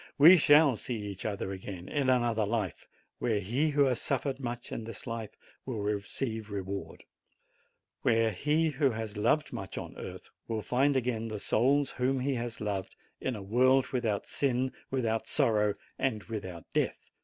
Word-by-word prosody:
We 165 +6 +10
shall 145 -3 +6
see 125 - -3
each 100 -3 -6
other 100 -2 -2
again 95 -2 -7
in 140 -3 0
another 120 -3 +2
life, 105 -7 -2 0.3
where 110 -3 +1
he 125 +11 +1
who 145 -1 +4
has 130 -3 +1
suffered 135 0 -1
much 120 -2 -5
in 115 - -4
this 115 -2 -7
life 115 -3 -5 0.3
will 125 -5 -4
receive 105 +2 -3
reward; 100 -1 -5 1.0
where 115 -1 +3
he 150 - +1
who 140 -1 +2
has 110 -2 -4
loved 120 +9 +1
much - - -6
on - - -6
earth - - -8 0.2
will 110 -2 -2
find 135 +3 +2
again 115 -3 -1
the 110 -1 -4
souls 135 +7 +2
whom 130 +1 0
he 140 +2 0
has 120 -2 -4
loved, 100 -3 -3 0.2
in 130 - -2
a 100 - -6
world 130 +6 +3
without 115 -6 -1
sin, 130 -1 0 0.2
without 115 -4 -1
sorrow, 105 -2 +2 0.2
and 110 -6 0
without 95 -7 -6
death. - - -1
115 Hz, 165 wpm, -30 LUFS, 105-130 Hz, 1.0 s, We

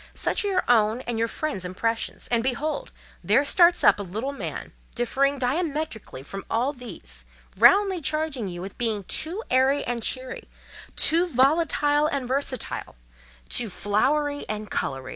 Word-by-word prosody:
Such - - +2
are - - -1
your 375 -2 +1
own 225 0 +3
and 240 -3 -3
your 230 - +2
friends' 290 - -3
impressions; 225 +5 -3
and 235 -1 +3
behold! 290 - -2 0.3
there 280 - +3
starts 345 +3 +5
up - - +6
a - - -2
little 215 +8 -4
man, 280 - -6 0.2
differing 275 +4 +1
diametrically 280 - -3
from 195 +7 -7
all 250 +5 0
these, 170 - -4 0.3
roundly 360 - +5
charging 305 -6 -1
you 175 -1 -6
with 195 - -9
being 220 -4 0
too 340 - -1
airy 265 +2 +3
and 240 -1 -3
cheery—too 260 +7 -2
volatile 295 +1 +2
and 280 -4 -2
versatile—too 60 - -4
flowery 285 +10 0
and 215 -1 -5
coloury. 135 -1 -3
255 Hz, 145 wpm, -25 LUFS, 210-295 Hz, 0.3 s, up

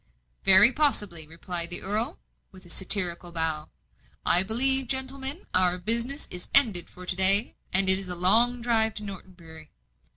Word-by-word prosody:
"Very 195 +5 +6
possibly," 205 - 0
replied 170 +1 -6
the 175 - -2
earl, 220 - -4 0.3
with 185 -2 -17
a 175 - -9
satirical 180 -2 0
bow. 160 -2 -4 0.6
"I 175 - +4
believe, 260 +6 +3
gentlemen, 265 +4 -6
our 180 -1 +1
business 235 - -2
is 180 0 -7
ended 220 -11 +5
for 180 - -13
to 180 - -4
day, 195 +4 +3 0.2
and 190 +1 0
it 190 0 +4
is 190 -2 -7
a 180 - -2
long 235 +7 +2
drive 220 -2 -1
to 210 - -8
Norton 190 -2 -11
Bury. 160 -3 -15
190 Hz, 165 wpm, -24 LUFS, 175-235 Hz, 0.6 s, Very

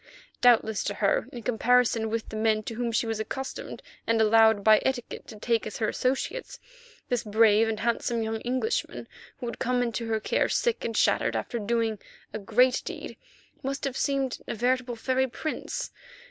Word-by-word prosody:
Doubtless 225 -3 +4
to - - -2
her, - - +1
in 240 -2 -8
comparison 240 -1 +2
with 225 0 -3
the - - -7
men 215 0 +1
to 225 - -5
whom 235 +1 -2
she 230 - +1
was 225 -1 -2
accustomed 265 +5 -5 0.2
and 230 0 +2
allowed 220 -1 +5
by 215 0 +6
etiquette 260 -3 -3
to 215 - -10
take 230 +1 0
as 215 - -6
her 220 - 0
associates, 265 - -2 0.5
this 245 -2 0
brave 220 +1 +4
and 220 -1 -3
handsome 235 0 0
young 220 0 -3
Englishman, 255 - -2 0.3
who 250 - -6
had 235 - -5
come 250 0 +1
into 235 -1 -3
her 220 -1 0
care - - 0
sick 475 -2 0
and 230 - -2
shattered - - +2
after 240 - -3
the 205 - -7
doing 225 -2 0 0.3
of 215 - -4
a - - -15
great 250 +5 +3
deed, - - -7 0.5
must 275 0 -4
have 275 -2 -2
seemed 270 -2 -1
a - - -3
veritable 250 +1 0
fairy 260 +3 0
prince. 315 - -4
230 Hz, 190 wpm, -27 LUFS, 220-250 Hz, 0.5 s, by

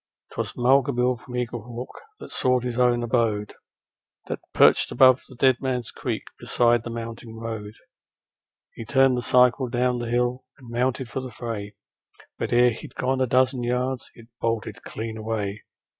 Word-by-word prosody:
'Twas - - -3
Mulga 135 +3 +4
Bill, 125 +1 +2
from 125 +2 -10
Eaglehawk, 120 0 -5 0.3
that - - -10
sought 125 -1 +1
his 125 0 -3
own 120 -1 +3
abode, 110 -3 0 0.7
That - - -4
perched - - +5
above 130 +1 +6
the 130 - -12
Dead 130 0 +3
Man's 125 -3 -2
Creek, - - -3 0.2
beside 120 -1 +2
the 120 - -7
mountain 115 0 -7
road. 110 -2 -6 1.0
He - - -7
turned 135 +2 +4
the 125 - -1
cycle 125 +1 +4
down 125 0 +1
the 120 -1 -4
hill 125 +1 0
and 125 -4 -13
mounted 125 +2 0
for 120 - -4
the 130 - -6
fray, 110 -4 -6 0.6
But - - -2
ere 120 0 +5
he'd 115 - -9
gone 130 0 0
a 130 - +2
dozen 130 +1 +2
yards 125 +1 -1
it 115 - -14 0.2
bolted 115 -1 -2
clean 110 0 -6
away. 110 -2 -3
120 Hz, 165 wpm, -25 LUFS, 115-125 Hz, 1.0 s, above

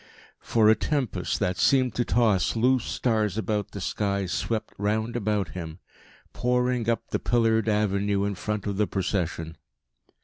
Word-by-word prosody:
For 110 -2 +2
a 110 - +8
tempest 135 +1 -1
that 90 - 0
seemed 130 -4 +3
to 120 - 0
toss 110 -7 +2
loose 125 +2 +2
stars 110 -4 0
about 105 -2 -1
the 100 - -7
sky 100 +1 -1
swept 110 +4 -2
round 110 +3 -1
about 105 -4 0
him, 80 -3 -7 0.6
pouring 125 -1 0
up 115 - -2
the - - 0
pillared 115 -2 +2
avenue 100 -1 +1
in 100 - -1
front 105 +2 -3
of 100 -2 -2
the 105 -1 +2
procession. 90 -4 -2
105 Hz, 150 wpm, -26 LUFS, 100-115 Hz, 0.6 s, a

